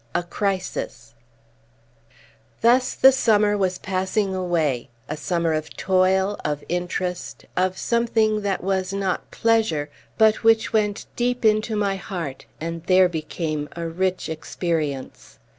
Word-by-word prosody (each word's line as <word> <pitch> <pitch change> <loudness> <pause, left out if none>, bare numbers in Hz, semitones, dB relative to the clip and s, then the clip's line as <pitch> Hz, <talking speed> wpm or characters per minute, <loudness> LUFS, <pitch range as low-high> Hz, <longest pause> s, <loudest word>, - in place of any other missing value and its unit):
A - - +1
CRISIS 185 - -3 1.5
Thus 250 +2 +4
the 265 - +7
summer 210 -5 +3
was 185 -2 0
passing 190 +1 -1
away, 165 -9 0 0.2
a 155 - -3
summer 170 +1 0
of 155 0 -4
toil, 190 +1 +2
of 150 -1 -2
interest, 180 +1 -3
of 185 0 +1
something 225 -2 +1
that 200 -3 -1
was 190 0 0
not 195 -2 -2
pleasure, 220 -11 +1 0.3
but 220 0 +4
which 225 0 +4
went 210 -1 +1
deep 245 0 0
into 215 +1 +3
my 200 -2 0
heart, 170 -9 -6
and 165 0 -5
there 185 0 +5
became 155 -2 -3
a 170 -1 -4
rich 185 +2 -1
experience. 155 - -4
185 Hz, 125 wpm, -23 LUFS, 165-210 Hz, 1.5 s, the